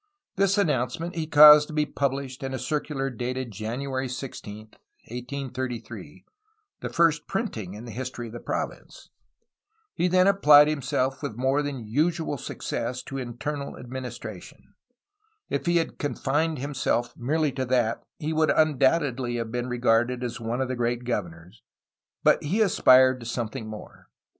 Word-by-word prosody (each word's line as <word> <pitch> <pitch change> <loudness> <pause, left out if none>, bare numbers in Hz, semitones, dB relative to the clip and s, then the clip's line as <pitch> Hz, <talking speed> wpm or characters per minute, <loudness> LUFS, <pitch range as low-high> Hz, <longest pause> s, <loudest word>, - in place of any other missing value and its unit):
This 195 +1 +2
announcement 160 - 0
he 160 -2 -3
caused 150 -1 +9
to 155 - -8
be 150 -1 +2
pubhshed 135 -1 -3
in 135 -1 -3
a - - -2
circular 145 -2 -2
dated 125 +1 -4
January 130 +6 -3
16, 120 -5 -7 0.5
1833, 125 0 -6 0.3
— 435 -1 -48
the - - -4
first 165 -3 +2
printing 110 - -3
in 110 +3 -9
the 120 - -8
history 125 0 -5
of 115 - -9
the 120 - -6
province. - - -5 0.8
He 175 - +1
then 185 +1 +4
applied 150 -7 +7
himself 135 -2 -1
with 140 -7 -4
more 135 +3 +1
than 140 -5 -5
usual 155 +3 0
success 125 +1 -4
to 135 -1 -6
internal 140 +4 -5
administration. 120 -6 -8 0.8
If - - -2
he 175 0 +3
had 165 - -2
confined 150 +2 -1
him 140 +3 -5
self 120 -2 -1
merely 150 +4 0
to 130 0 -3
that, 120 -2 +1 0.2
he 155 0 -3
would 155 0 +2
undoubtedly 135 -4 +2
have 115 -1 -3
been 120 +1 -2
re 125 - -2
garded 120 +1 +2
as 120 -1 -4
one 115 +3 -2
of 130 - 0
the 130 - -3
great 120 0 -1
governors, 90 -4 -5 0.6
but - - +4
he 175 +9 0
aspired 130 -10 +5
to 115 - -8
some 120 -2 -2
thing 115 -2 -7
more. 110 -1 -10
130 Hz, 160 wpm, -26 LUFS, 120-150 Hz, 0.8 s, caused